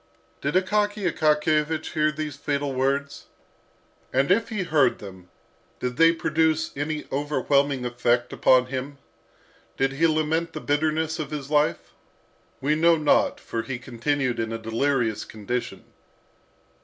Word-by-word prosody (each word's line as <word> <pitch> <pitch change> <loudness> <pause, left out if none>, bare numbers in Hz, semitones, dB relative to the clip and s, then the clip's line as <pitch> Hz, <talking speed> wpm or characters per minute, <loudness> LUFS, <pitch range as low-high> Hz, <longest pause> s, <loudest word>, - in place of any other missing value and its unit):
Did 145 +4 -2
Akaky 205 +1 +1
Akakiyevich 155 0 +1
hear 155 0 +2
these 150 -2 -5
fatal 140 -1 -2
words? 140 +2 -1 0.8
And 135 +5 +2
if 225 +4 +2
he 210 -5 -2
heard 145 -7 +2
them, 95 -3 -12 0.5
did 125 0 -3
they 165 +1 +6
produce 160 -1 0
any 150 +2 -3
overwhelming 140 -2 +1
effect 120 0 0
upon 130 -1 +4
him? 130 +2 -5 0.8
Did 135 0 +1
he 165 +4 +3
lament 160 +1 0
the 155 - -5
bitterness 155 +2 0
of 155 - -4
his 145 -2 -6
life? 150 0 +1 0.7
We 140 +3 +2
know 165 +2 +4
not, 150 -2 +2
for 115 - -4
he 125 +1 -5
continued 130 +1 -2
in 115 0 -2
a 115 - -2
delirious 115 0 0
condition. 110 +3 -5
145 Hz, 135 wpm, -25 LUFS, 130-155 Hz, 0.8 s, they